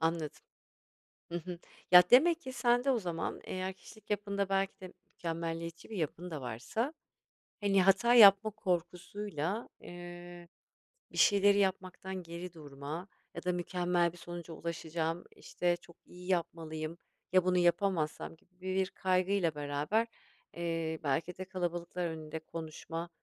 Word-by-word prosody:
anladım. 165 -1 +1 1.0
Hı 170 - -8
hı. 175 +1 -7 0.3
Ya, 180 0 +11
demek 325 +7 +7
ki 260 - -7
sende 245 +1 +3
o 245 - +3
zaman 170 -4 -3
eğer 185 0 -3
kişilik 210 +2 -16
yapında 200 -1 0
belki 195 0 0
de 185 -1 -9 0.2
mükemmeliyetçi 165 +1 -4
bir 215 - -5
yapın 170 +2 -3
da 155 -4 -4
varsa, 130 - -2 0.7
hani, 195 -2 +4
hata 195 +6 +5
yapma 210 -1 +9
korkusuyla, 185 0 -2
eee, 175 0 -9 0.7
bir - - -10
şeyleri 200 0 +6
yapmaktan 190 -1 -1
geri 170 +1 -7
durma 150 +3 -7 0.3
ya - - -6
da, 180 - +1
"Mükemmel 175 -1 +1
bir - - -14
sonuca 175 -1 -7
ulaşacağım. 165 +1 -3
İşte, 175 -1 0
çok 170 -1 -18
iyi 180 0 -12
yapmalıyım. 165 -2 -2 0.3
Ya 185 -1 +5
bunu 180 0 +3
yapamazsam?" 175 -2 +1
gibi 180 +3 -33
bir 190 +1 0
kaygıyla 185 -2 +1
beraber, 150 +10 0 0.5
eee, 165 -2 -2
belki 165 +4 -1
de 190 - -4
kalabalıklar 175 -1 -3
önünde 160 -1 -5
konuşma 165 +1 -6
175 Hz, 135 wpm, -33 LUFS, 165-195 Hz, 1.0 s, Ya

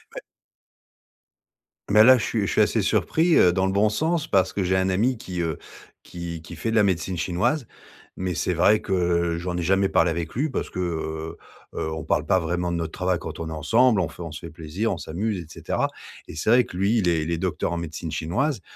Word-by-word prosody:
Ouais. - - -5 1.7
Mais 105 +1 +7
là, 130 +2 +8
je - - -3
suis 110 - -1
je - - -2
suis - - +3
assez - - +2
surpris, 165 +1 +2
heu, 90 - +6
dans 95 +1 +1
le 95 - +1
bon 100 +2 +3
sens, 160 +7 0
parce 95 -9 +2
que 100 - -1
j'ai 95 +1 +1
un 95 0 +1
ami 115 +7 +1
qui 95 -7 -5
heu, 80 -3 -2 0.5
qui 85 -1 -7
qui - - -9
fait 115 - -3
de - - -1
la 110 - +5
médecine 95 -1 0
chinoise. 110 - 0 0.5
Mais 90 -1 -3
c'est 90 - 0
vrai 105 +6 +4
que 85 -3 0
j'en 90 +1 -3
ai - - -1
jamais 95 +3 +3
parlé 85 0 +3
avec 85 0 -4
lui 145 +6 0
parce 130 - -3
que, - - -10
heu 80 -2 -3 0.4
heu, 80 - -2
on 80 -1 -5
parle - - 0
pas 95 - +3
vraiment 90 +1 -2
de 85 - -1
notre 80 -1 -3
travail 90 0 0
quand - - -7
on 80 - -4
est - - -7
ensemble. 110 - +3
On 85 - 0
fait - - -12
on 85 -2 -6
se 75 - -7
fait 85 - -8
plaisir, 85 +8 -3
on - - -5
s'amuse, 95 +6 -3
et 85 - -7
cetera. - - -2 0.4
Et - - -9
c'est 95 +8 0
vrai 125 +1 +6
que 90 - -9
lui, 100 +5 +2
il 95 - 0
est 80 -2 +1
il 80 - -3
est 85 - 0
docteur 85 -3 -2
en - - -2
médecine 85 0 -5
chinoise 105 - -1
90 Hz, 245 wpm, -24 LUFS, 85-105 Hz, 1.7 s, là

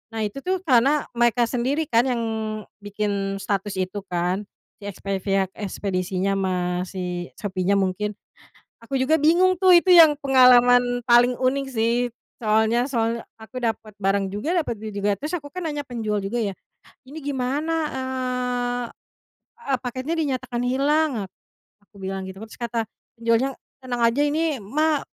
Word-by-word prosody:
Nah 220 - -2
itu 210 +6 -4
tuh 370 +4 -2
karena 275 0 +3
mereka 240 0 +2
sendiri 265 +6 0
kan 235 +3 +4
yang 240 -2 0 0.6
bikin 205 -1 -2
status 200 0 -2
itu 185 +2 -2
kan, 180 +3 -1 0.3
si 200 - -11
expe 195 0 -3
pihak 195 -1 0
ekspedisinya 190 -1 -2
ma 185 -1 0 0.3
si 180 -2 -4
Shopee-nya 195 -1 -1
mungkin. 195 +2 0 0.7
Aku 265 +4 -2
juga 260 +5 +2
bingung 355 +5 +4
tuh 370 -2 +7
itu 365 +1 +3
yang 320 -3 +8
pengalaman 245 -2 +5
paling 240 +1 +5
unik 270 +2 0
sih, 230 -1 +1 0.5
soalnya 220 +3 +2
soalnya 230 -1 0 0.2
aku 225 +3 -8
dapet 225 -2 -3
barang 195 0 +1
juga, 290 - -1
dapet 300 -7 -1
duit 220 0 -5
juga, 200 0 +1
terus 300 - -4
aku 290 - -13
kan 365 - -4
nanya 295 -1 -4
penjual 220 -4 -2
juga 200 +5 -2
ya, 200 -2 -1 0.6
"Ini 295 - -9
gimana, 280 +3 -1 0.2
eee 250 -2 -2 0.8
eee, 270 - +2
paketnya 255 +6 -3
dinyatakan 255 -5 -2
hilang," 290 +5 +2 0.2
ak - - -41 0.6
aku 210 - -23
bilang 190 0 -4
gitu, 190 +2 -9
terus 220 - -14
kata 235 -1 -1 0.3
penjualnya, 230 +3 +1 0.3
"Tenang 245 -2 -3
aja 230 +4 +3
ini 305 0 0
mah 300 +8 +1
240 Hz, 155 wpm, -23 LUFS, 205-270 Hz, 0.8 s, yang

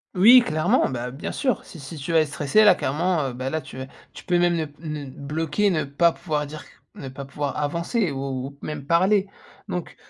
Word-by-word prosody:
Oui, 230 +7 +8
clairement, 155 0 +2
bah, 125 -1 -4
bien 135 +5 -6
sûr. 255 -7 -1
Si 165 - -12
si 140 +4 -9
tu 150 +3 -5
vas 165 - +5
être 155 - +2
stressée, 145 +9 +3
là, 200 -3 +7
clairement, 160 +1 0
heu, - - -7
bah, 130 +2 -4
là, 160 +1 -2
tu - - -11
vas 130 - -5 0.3
tu - - -12
peux 175 -1 +2
même 175 0 +3
le 160 - 0 0.2
n 150 0 -3
n 140 -2 -7
bloquer, 155 +8 -1
ne 155 -5 0
pas 165 +5 +3
pouvoir 155 -4 -3
dire 150 +1 -9
qu - - -19 0.3
ne 135 - -7
pas 130 +1 -7
pouvoir 140 +1 -4
avancer 170 - -1
ou 135 -1 -4
ou 140 0 -12
même 150 -2 -6
parler. 190 +5 +3 0.4
Donc, 180 -2 -4
155 Hz, 230 wpm, -24 LUFS, 140-175 Hz, 0.4 s, Oui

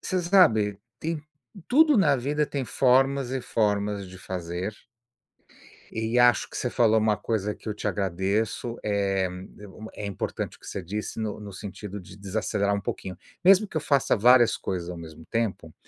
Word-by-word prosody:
você 185 -1 -1
sabe, 115 - +4 0.2
tem 160 -1 -3 0.4
tudo 300 +1 +5
na 155 -8 +4
vida, 145 +4 0
tem 140 -2 -3
formas 135 +1 +3
e 135 0 -2
formas 105 -3 0
de 95 - -11
fazer. 90 +2 -4 1.2
E 110 +2 0
acho 120 0 +4
que - - -11
você 125 - -1
falou 110 -2 +3
uma 105 -1 +2
coisa 105 -1 -2
que - - -14
eu 105 - -1
te 105 - -4
agradeço, 100 +5 -1
eh, 100 -2 +1 0.3
é 105 - -10
uma 110 +3 -11
é 105 - -5
importante 100 -1 -4
o - - -38
que - - -14
você 95 - -5
disse 105 +5 -5
no 110 -1 -3
no 105 -1 -8
sentido 100 +1 -7
de 90 +1 -13
desacelerar 100 0 -1
um 100 - -3
pouquinho. 95 -2 -5 0.3
Mesmo 195 +3 +6
que - - -16
eu - - -1
faça 140 -3 +2
várias 120 +2 +5
coisas 90 -2 -4
ao 90 - -6
mesmo 80 -1 -11
tempo, 115 -1 -2
105 Hz, 180 wpm, -26 LUFS, 100-125 Hz, 1.2 s, Mesmo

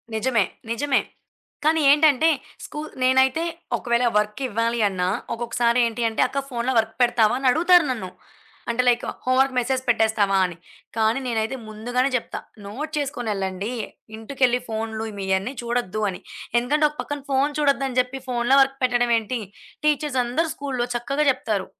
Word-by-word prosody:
నిజమే. 225 -2 +2 0.3
నిజమే. 275 +4 +1 0.6
కానీ 315 +1 +3
ఏంటంటే, 300 0 +5 0.4
స్కూ 300 - -7 0.2
నేనైతే 265 +4 +3 0.3
ఒకవేళ 235 0 0
వర్కివ్వాలి 230 +2 -1
అన్నా, 180 -2 -1 0.3
ఒకొక్కసారి 235 +1 0
ఏంటి 230 +1 -5
అంటే, 220 - -1
"అక్క 275 - -2
ఫోనులో 245 +1 -1
వర్క్ 225 0 +1
పెడతావా" 240 -2 +4
అని 270 - 0
అడుగుతారు 345 +3 +5
నన్ను. 220 -7 -4 0.6
అంటే 235 +2 +2
లైక్ 240 0 +3 0.2
హోమ్ 255 0 +2
వర్క్ 270 0 +3
మెసేజ్ 255 +1 0
పెట్టేస్తావాని. 200 -6 +2 0.4
కానీ 220 +3 +2
నేనైతే 225 +2 -1
ముందుగానే 245 +5 -1
జప్తా 245 - -3 0.3
నోట్ 275 +10 -6
చేసుకొని 270 -5 -3
ఎళ్ళండి, 195 +2 -3 0.4
ఇంటికెళ్లి 250 +2 0
ఫోనులు 220 0 -3
మీయన్నీ 190 +5 -1
చూడొద్దు 235 -4 -2
అని. 180 - -6 0.4
ఎందుకంటే, 295 +6 +1
ఒక 300 - -16
పక్కన 290 -1 -5
ఫోను 275 +2 +2
చూడొద్దు 280 -2 +2
అని 255 - -6
జేప్పి, 255 +2 -1
ఫోనులో 245 +2 +3
వర్క్ 270 0 +1
పెట్టడం 245 -1 +2
ఏంటి? 225 +2 -3 0.5
టీచర్స్ 295 -3 +1
అందరూ 315 +7 0
స్కూలులో 260 -4 -3
చక్కగా 275 +5 -1
చెప్తారు. 215 -6 -2
245 Hz, 145 wpm, -23 LUFS, 220-270 Hz, 0.6 s, ఏంటంటే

